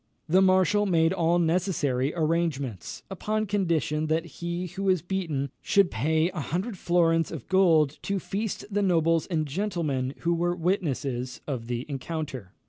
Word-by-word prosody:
The 180 +4 +4
marshal 190 +2 +4
made 165 -1 +3
all 170 -1 +2
necessary 160 -6 +1
arrangements, 155 - -1
upon 215 +3 -1
condition 165 - 0
that 160 +1 0
he 170 +1 -4
who 195 +3 -5
was 185 -4 +2
beaten 160 -8 -2
should 200 -3 +3
pay 160 +8 +1
a 180 - -5
hundred 185 +9 -3
florins 165 -2 +2
of 155 -8 -7
gold 165 -6 +3
to 200 - -1
feast 200 +3 -3
the 205 +1 +1
nobles 165 -4 +2
and 160 -4 0
gentlemen 150 -6 -2
who 170 0 +1
were 175 +1 0
witnesses 140 - -2
of 125 -6 -4
the 120 +1 -3
encounter. 140 - -5
165 Hz, 150 wpm, -27 LUFS, 150-185 Hz, -, The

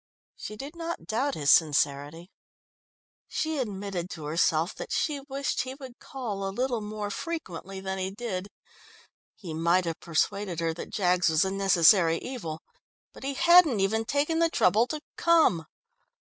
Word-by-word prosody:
She 215 - -7
did 280 +8 -8
not 335 0 -5
doubt 260 +6 -1
his 145 -1 +3
sincerity. 150 +2 +2 1.0
She 315 -2 -2
admitted 195 -6 -4
to 160 -5 -7
herself 160 +2 +1
that - - -8
she 295 -3 0
wished 275 +1 -1
he 260 0 -6
would 265 -3 -11
call 220 -7 -5
a 195 - -1
little 245 +3 -1
more 210 0 -5
frequently 195 - -5
than 190 0 -4
he 185 0 -2
did. 200 -2 -5 0.9
He 175 -6 -8
might 170 +3 +2
have 165 -1 -3
persuaded 175 +2 -1
her 165 -1 0
that 165 - -8
Jaggs 180 -3 +2
was 160 +2 +3
a 190 - -1
necessary 180 -3 +4
evil, 165 -12 -6 0.5
but - - -13
he 275 0 -3
hadn't 340 - +6
even 215 +3 +1
taken 290 +7 0
the 335 0 +3
trouble 220 - +3
to 305 +1 -4 0.2
come. 320 - +3
195 Hz, 160 wpm, -27 LUFS, 170-265 Hz, 1.0 s, hadn't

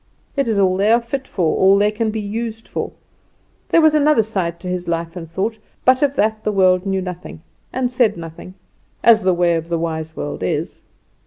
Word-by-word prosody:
It 275 -3 0
is 220 -3 0
all 185 -2 +3
they 205 +3 +3
are 235 - +5
fit 260 +3 -5
for, 170 -5 0
all 190 +1 +5
they 205 +1 +3
can 220 +1 -1
be 220 +1 -3
used 225 +2 -5
for. - - -4 0.8
There 335 - +5
was 315 -1 +5
another 300 -5 +4
side 185 -6 -2
to 185 - -7
his 180 -1 -3
life 165 0 -2
and 165 -3 -7
thought; 210 +6 -2 0.3
but 255 0 +5
of 280 -1 +2
that 220 -2 0
the 215 - 0
world 185 -1 +3
knew 190 -1 0
nothing, 180 -3 -8 0.3
and 250 -1 -1
said 240 -6 +2
nothing, 165 +2 -9 0.5
as 225 -2 +6
the 185 -2 +2
way 175 0 +2
of 165 0 -3
the 170 - 0
wise 160 -1 -4
world 145 - -5
is. 90 - -3
195 Hz, 215 wpm, -19 LUFS, 170-225 Hz, 0.8 s, as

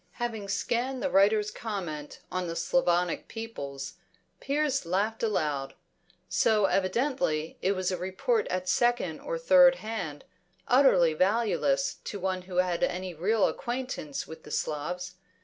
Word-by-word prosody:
Having 225 -4 -4
scanned 245 +6 -1
the 280 - 0
writer's 210 +2 +4
comment 175 -10 -5
on 185 -1 -2
the 165 - -4
Slavonic 175 -1 +1
peoples, 140 -12 -6 0.4
Piers 280 -1 0
laughed 200 +6 -1
aloud; 150 -11 -1 0.5
so 215 -3 +3
evidently 190 - 0
it 195 - +2
was 185 -1 -1
a 185 - -1
report 190 - 0
at 185 0 -2
second 240 +5 +1
or - - -3
third 275 - +6
hand, 195 - -5 0.4
utterly 220 - +5
valueless 220 - +1
to 205 - -5
one 185 0 -1
who 180 - -6
had 180 -1 +1
any 185 0 -1
real 195 +6 +2
acquaintance 245 - -4
with 160 0 -10
the - - -13
Slavs. 180 +5 -3
195 Hz, 135 wpm, -28 LUFS, 175-240 Hz, 0.5 s, third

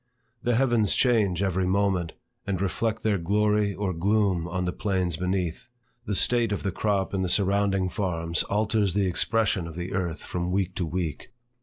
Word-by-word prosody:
The 120 0 +1
heavens 120 -4 +2
change 105 -7 +2
every 95 -1 0
moment, 95 -3 +1 0.3
and 95 -3 -1
reflect 110 +3 -1
their 105 -3 +1
glory 105 +3 +1
or 100 -3 -2
gloom 95 -1 +1
on 90 +1 -2
the 90 - -2
plains 95 -5 -1
beneath. 90 +4 -2 0.4
The 105 - 0
state 120 +2 +3
of 100 - -2
the 100 - -1
crop 100 -2 -1
in 95 - 0
the 90 - 0
surrounding 100 -1 +2
farms 85 -4 -1
alters 105 -2 +1
the 100 -1 +2
expression 95 0 +1
of 80 - -9
the 90 +2 -5
earth 90 -4 -2
from 90 0 -3
week 95 -1 0
to 90 -4 -1
week. 85 -3 -4
95 Hz, 175 wpm, -26 LUFS, 90-105 Hz, 0.4 s, state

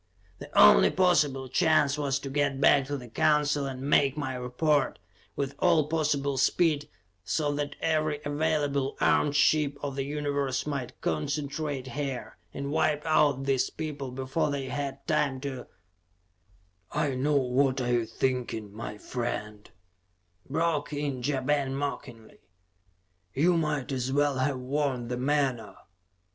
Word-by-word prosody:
The - - -9
only 65 -3 +8
possible 150 -8 +2
chance 145 +1 +3
was 140 -2 0
to 135 - -6
get 140 -1 0
back 140 0 +4
to 145 0 -2
the 125 -2 -10
Council 145 +3 +2
and 130 -1 -6
make 140 0 +3
my 140 -3 -2
report, 130 +4 0 0.4
with 140 0 -2
all 170 -4 +4
possible 145 -3 0
speed, 150 0 +2 0.3
so 145 - 0
that 145 0 -3
every 155 -2 0
available 145 -2 0
armed 145 -1 +2
ship 145 -1 +3
of 140 -2 -3
the 135 - -1
universe 140 -2 -2
might 140 -4 -4
concentrate 140 - -2
here, 135 -6 -5
and 140 +5 -5
wipe 150 0 +1
out 150 -4 +3
these 135 -2 +1
people 150 -4 -5
before 130 +5 -2
they 140 -2 -3
had 140 -1 -4
time 150 -4 0
to 135 -3 -6 1.2
"I 150 -2 0
know 140 +3 0
what 130 +1 +1
you 120 -1 +1
are - - -4
thinking, 115 -3 -2
my 105 -1 -6
friend," 105 -3 -5 0.8
broke 155 0 0
in 145 -3 -3
Ja 135 +1 -1
Ben 135 0 0
mockingly. 135 -5 -6 1.0
"You 170 +5 +3
might 150 -5 -1
as 130 -1 -2
well 145 -1 +1
have 130 +1 0
worn 130 -2 -2
the 125 - -2
menore! 130 -4 -1
140 Hz, 140 wpm, -28 LUFS, 130-150 Hz, 1.2 s, only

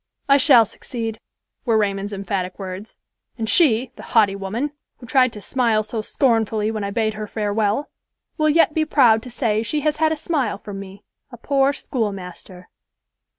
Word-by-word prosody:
"I 275 0 +6
shall 260 -5 +6
succeed," 225 -1 -6 0.4
were 230 -4 +2
Raymond's 200 -1 -1
emphatic 195 -2 -3
words; 190 +2 -8 0.4
"and 225 -2 -3
she, 250 -4 +3
the - - -9 0.2
haughty 205 -3 +5
woman, 215 +9 -3 0.3
who 245 - -12
tried 255 0 +3
to 210 - -9
smile 230 -2 +1
so 215 +1 -4
scornfully 220 -3 +1
when 215 -2 -4
I 200 - -2
bade 220 +1 0
her 215 0 -6
farewell, 210 +4 -1 0.4
will 310 -1 +2
yet 320 0 +4
be 315 - +1
proud 245 -8 +4
to 250 - -10
say 220 -3 0
she 295 +6 -2
has 300 +1 0
had 315 0 +2
a 315 - -1
smile 290 -9 -1
from 200 -1 -8
me, 195 0 -11 0.3
a 240 - -10
poor 275 +3 +2
school 230 -6 -2
master." 180 -1 -10
220 Hz, 180 wpm, -21 LUFS, 205-265 Hz, 0.4 s, I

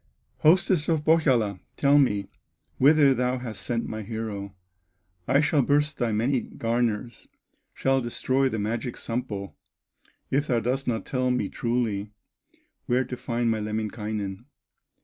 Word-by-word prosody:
"Hostess 175 0 +4
of 155 -2 +1
Pohyola, 125 - +3 0.2
tell 140 +1 +5
me 105 -8 +1 0.5
Whither 145 0 +6
thou 125 0 0
hast 120 -3 -6
sent 115 -1 -2
my 110 0 -5
hero; 105 -2 -5 0.7
I 140 - +4
shall 145 -1 +3
burst 145 +3 +1
thy 120 -3 +1
many 120 +4 +1
garners, 115 0 -2 0.5
Shall 135 0 +1
destroy 130 +3 +1
the 110 - -3
magic 115 +4 -3
Sampo, 115 -5 -4 0.8
If 145 +3 +1
thou 120 -2 +2
dost 125 +4 -1
not 115 -2 -1
tell 130 -1 0
me 125 -6 0
truly 115 -4 -1 0.8
Where 125 +1 +2
to 125 - -5
find 120 -1 -1
my 110 - 0
Lemminkainen." 105 -1 -4
120 Hz, 135 wpm, -26 LUFS, 110-135 Hz, 0.8 s, Whither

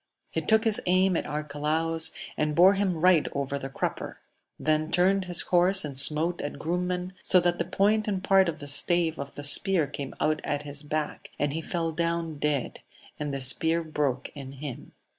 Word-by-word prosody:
He - - -2
took 220 0 +2
his 220 -2 +4
aim 185 +1 +3
at - - -2
Arcalaus, 150 +2 -1 0.3
and 150 0 -1
bore 185 +3 +6
him 195 -3 -1
right 180 -2 +4
over 140 0 -3
the 135 - -6
crupper; 135 - -4 0.4
then 155 +1 0
turned 190 +2 +2
his 175 -1 +3
horse 180 +1 +3
and 140 -3 -7
smote 155 +5 +5
at 145 - -6
Grumen, 180 +3 -3
so 185 - +4
that 175 0 0
the 170 - -1
point 215 +2 +1
and 195 -3 -2
part 190 -2 +4
of 160 - -5
the 145 - -10
stave 165 +3 +2
of 140 0 -7
the 145 - -7
spear 170 +3 +3
came 140 -1 -7
out 155 0 0
at 145 0 -3
his 145 0 -4
back, 150 0 -4
and 145 0 -1
he 160 - -3
fell 165 0 -3
down 165 -1 -3
dead, 145 -4 -2 0.4
and 150 -1 -3
the 140 -1 -4
spear 160 +6 0
broke 145 -4 -2
in 135 -2 -9
him. 140 -2 -9
160 Hz, 195 wpm, -26 LUFS, 145-180 Hz, 0.4 s, bore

